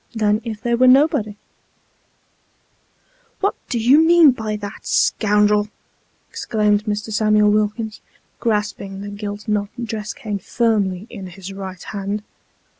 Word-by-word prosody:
than 215 0 +1
if 220 -3 -5
they 235 +2 -1
was 255 +2 +5
nobody! 255 -6 +3 0.9
" - - -40
What 400 - +2 0.2
do 245 - -1
you 260 +7 +5
mean 330 -3 +7
by 220 -3 -4
that, 205 -1 -8
scoundrel? 210 0 +2 0.3
" - - -42
exclaimed 210 -1 0
Mr. 210 0 -3
Samuel 215 0 +3
Wilkins, 215 +1 -1 0.4
grasping 205 -3 -2
the 205 - -6
gilt 205 +1 -6
knobbed 210 +3 -2
dress 215 -1 -4
cane 210 -3 -5
firmly 205 -3 0
in 195 -5 -8
his 190 +1 -9
right 190 -2 -7
hand. 205 +1 -4
210 Hz, 135 wpm, -20 LUFS, 205-230 Hz, 0.9 s, mean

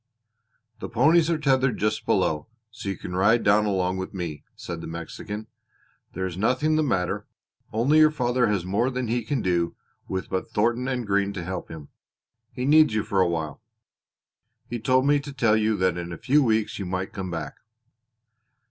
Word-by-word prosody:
"The - - -6
ponies 155 +7 +4
are 165 - +2
tethered 135 -4 +2
just 105 +1 -1
below, 75 -1 +1 0.2
so 110 -3 -6
you 95 - -3
can 90 - -6
ride 105 +5 +3
down 105 +1 +4
along 95 -2 0
with 95 +1 -5
me," 85 -5 -5
said - - -6
the - - -7
Mexican. 85 +6 -6 0.7
"There 95 +1 -2
is 90 -2 -4
nothing 130 - +1
the 155 - +3
matter, 95 -12 -1 0.4
only 130 +8 +3
your 155 0 +7
father 125 -4 +1
has 100 -4 0
more 100 +7 +1
than 125 -3 -3
he 120 +1 0
can 130 +3 -2
do 85 -2 0 0.3
with 95 0 -3
but 95 -1 -3
Thornton 120 +4 +1
and 125 -3 -2
Green 100 0 +1
to 90 -3 -5
help 90 +1 -5
him. 80 -3 -9 0.6
He 125 -1 -4
needs 155 -4 +5
you 110 - +1
for 100 -3 +1
a 90 - +3
while. 80 +2 -3 1.1
He 120 - -4
told 130 +3 +2
me 145 0 +4
to 140 0 -8
tell 115 -5 +2
you 110 0 +1
that 90 -1 +1
in 85 0 -6
a 85 - -6
few 135 +6 +3
weeks 110 -5 +1
you 95 - -4
might 95 +1 -3
come 95 -2 -4
back." 85 -2 -5
105 Hz, 190 wpm, -25 LUFS, 95-130 Hz, 1.1 s, your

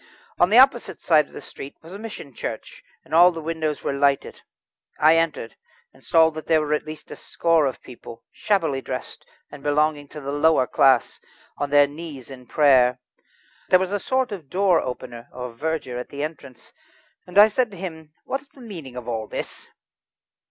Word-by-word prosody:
On 175 - +5
the 220 - +4
opposite 255 -2 +4
side 155 -3 +3
of - - -22
the - - -8
street 135 - -10
was 165 +3 -12
a 200 - -8
mission 210 - -9
church, - - -7 0.2
and - - -13
the 170 0 +6
windows 160 -1 -3
were - - -1
lighted. 140 0 0 0.6
I 155 +2 +6
entered, 165 -8 -1 0.4
and - - -21
saw 160 -1 +4
that 155 0 -8
there 160 - +4
were 150 -1 -1
at 150 - -2
least 155 0 -9
a - - -6
score 165 -3 +1
of 130 - -6
people, 120 -2 -12
shabbily 160 -10 0
dressed, - - -6 0.3
and 145 - -10
belonging 145 0 +1
to 150 - -10
the 140 -1 -5
lowest 145 -2 +2
class, 130 -3 +3 0.3
on 145 0 -3
their 145 0 +6
knees 145 -3 -9
in 125 -2 -11
prayer. 130 -4 +4 0.7
There 185 - +7
was 190 +1 -2
a 205 - 0
sort 260 +3 -1
of 170 -9 -8
door 185 -1 +3
opener 120 -2 -7
or 125 -1 -6
verger 145 -2 -3
at 125 - -7
the 145 +1 -5
entrance, 140 -5 -9 0.5
and 180 +2 -6
I 210 +1 +10
said 235 +2 0
to 195 - -12
him: 160 -4 -8
"What 270 - -3
is 275 - -25
the 265 - -17
meaning 165 - -9
of 125 -1 -7
all 110 -2 -3
this?" - - -6
155 Hz, 195 wpm, -23 LUFS, 135-175 Hz, 0.7 s, I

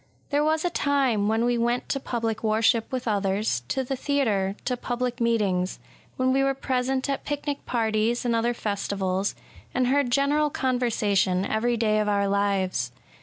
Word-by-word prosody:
There 290 +1 +2
was 315 +2 +1
a 350 - +1
time 270 -10 +1
when 225 +2 +2
we 240 -1 +1
went 240 +1 0
to 275 - 0
public 225 -4 -3
worship 225 +1 +2
with 255 -2 -3
others, 200 - 0
— - - -30
to 265 - 0
the 270 +2 -3
theatre, 220 -9 0
— - - -31
to 250 - 0
public 245 0 -3
meetings; 200 -6 +1 0.4
when 260 0 +2
we 270 - +3
were 275 0 +1
present 260 0 -1
at 275 -1 -2
picnic 290 -1 -3
parties 225 0 0
and 235 -1 +2
other 235 +1 +1
festivals, 200 -2 -2 0.4
and 255 - +2
heard 270 0 +2
general 285 +4 +2
conversation 215 -8 +1
every 235 +3 0
day 215 -1 +2
of 210 0 +1
our 200 -1 +2
lives. 195 -10 0
235 Hz, 175 wpm, -25 LUFS, 205-260 Hz, 0.4 s, we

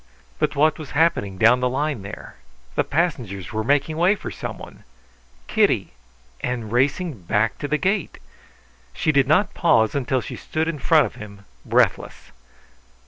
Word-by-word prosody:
But - - 0
what 155 +2 +2
was 155 -3 -8
happening 100 - +1
down 115 +5 +5
the 125 0 +1
line 140 -2 -2
there? 100 - -10 0.4
The - - +1
passengers 125 - -2
were 110 0 -1
making 145 +5 +1
way 180 +5 +4
for - - -7
someone. - - -8 0.6
Kitty, - - +1 0.5
and 120 -4 -3
racing 135 - 0
back 105 +6 0
to 145 - -3
the 150 +2 +1
gate! 195 0 -1 0.8
She 155 - +1
did 140 -3 +3
not 160 +8 +3
pause 110 - +3
until 135 -2 0
she - - -7
stood 160 +1 -2
in 165 -3 -3
front 155 +2 +4
of - - -8
him, 100 -1 -11 0.2
breathless. - - 0
140 Hz, 155 wpm, -22 LUFS, 110-155 Hz, 0.8 s, down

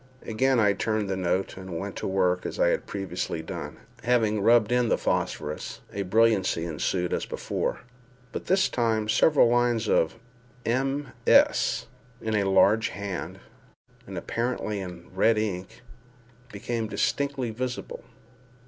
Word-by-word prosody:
Again 130 +3 +2
I 105 -2 +4
turned 110 +1 -1
the - - 0
note, 95 +1 -1
and 95 -3 -6
went 100 +3 -5
to - - -3
work 90 -2 +1
as - - -5
I - - +4
had - - -1
previously 90 -4 -4
done. - - -6 0.2
Having 110 -3 +2
rubbed 115 +1 +4
in 125 -2 +2
the - - +3
phosphorus, 75 +1 -2
a 100 - -2
brilliancy 100 -4 +2
ensued 90 +2 -1
as - - -2
before—but 125 0 -6
this 190 +1 +3
time 110 -3 0
several 120 +5 +5
lines 120 -1 +2
of 80 -1 +2 0.5
MS. 135 +4 +2 0.3
in 110 -1 -3
a 100 -2 +2
large 105 +3 +4
hand, 100 -2 -5 0.7
and - - -7
apparently 115 -3 -2
in 90 -2 -8
red 110 +4 +3
ink, 105 +2 -3 0.7
became 115 +2 -3
distinctly 130 +4 -1
visible. 125 +3 -5
110 Hz, 135 wpm, -26 LUFS, 95-120 Hz, 0.7 s, several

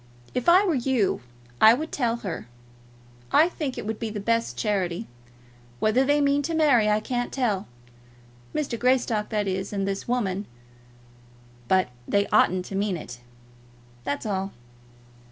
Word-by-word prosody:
If 250 +6 +1
I 370 +4 +6
were 360 - +2
you 250 - +1 0.4
I 220 +2 +9
would 310 +5 -5
tell 235 -4 0
her. 170 - -4 0.8
I 315 - +6
think 300 -7 -4
it - - -5
would 220 0 -3
be 225 - -3
the 210 -1 -5
best 230 +3 0
charity. 190 -5 -1 0.7
Whether 220 +5 +3
they 290 +2 +3
mean 285 0 +3
to 325 +3 -2
marry 265 -9 +4
I 210 0 +3
can't 245 +2 -3
tell, 220 -8 -1 0.8
Mr. 270 -6 -2
Greystock, 240 -4 +1
that 210 -2 -1
is, 190 +1 -2
and 195 -1 -2
this 195 0 -3
woman; 210 -5 -1 1.2
but 185 -6 +3 0.2
they 200 0 +2
ought 185 +1 +3
to 195 - -7
mean 195 -2 0
it; 120 -6 -9 0.8
that's 145 - -3
all. 195 -2 -2
220 Hz, 155 wpm, -25 LUFS, 195-260 Hz, 1.2 s, I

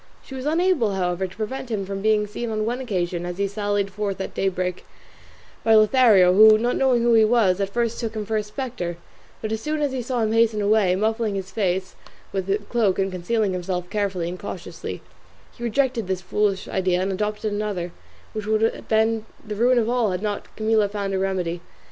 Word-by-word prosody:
She - - -11
was 265 +1 -4
unable, 320 - +2
however, 180 0 -1
to 185 - -15
prevent 235 +4 -4
him 205 -4 -2
from 195 0 -5
being 215 0 +3
seen 230 +3 -5
on 215 -1 -1
one 240 +3 -2
occasion, 180 -8 -2
as 175 0 -5
he 200 0 +1
sallied 205 0 -1
forth 200 -1 -3
at 190 - -4
daybreak, 185 -1 -1 0.8
by 225 -1 +5
Lothario, 215 -5 +6
who, 215 +2 +8
not 240 +3 0
knowing 255 -3 +2
who 235 0 +4
he 225 -1 +6
was, 215 -4 +3
at 195 - 0
first 235 +2 -1
took 225 -2 -4
him 215 -1 -3
for 220 +1 -2
a 215 - +2
spectre; 210 -6 -5 0.5
but, 215 - -2
as 220 0 -2
soon 305 +3 -2
as 290 -2 0
he 260 -1 -2
saw 245 0 -2
him 215 - 0
hasten 225 -1 +3
away, 205 -3 +3
muffling 220 +1 0
his 190 -1 -5
face 190 -2 -1 0.4
with 190 -1 -3
his 200 +2 +1
cloak 220 -6 +1
and 195 0 0
concealing 190 +3 0
himself 180 0 -3
carefully 195 -5 -1
and 180 +1 -5
cautiously, - - -7 0.5
he - - -16
rejected 240 -2 0
this 185 -1 -2
foolish 195 +1 0
idea, 185 -1 0
and 190 +1 0
adopted 210 +2 -2
another, 205 -4 -3 0.4
which 215 -1 -5
would 215 0 +2
have 225 - -1
been 220 0 +1 0.2
the 210 - -4
ruin 245 +4 +3
of 225 -2 +2
all 240 -3 +1
had 185 +2 -3
not 205 -1 -3
Camilla 215 -1 +2
found 200 -1 -3
a 190 - 0
remedy. 180 -3 -1
210 Hz, 210 wpm, -23 LUFS, 190-225 Hz, 0.8 s, who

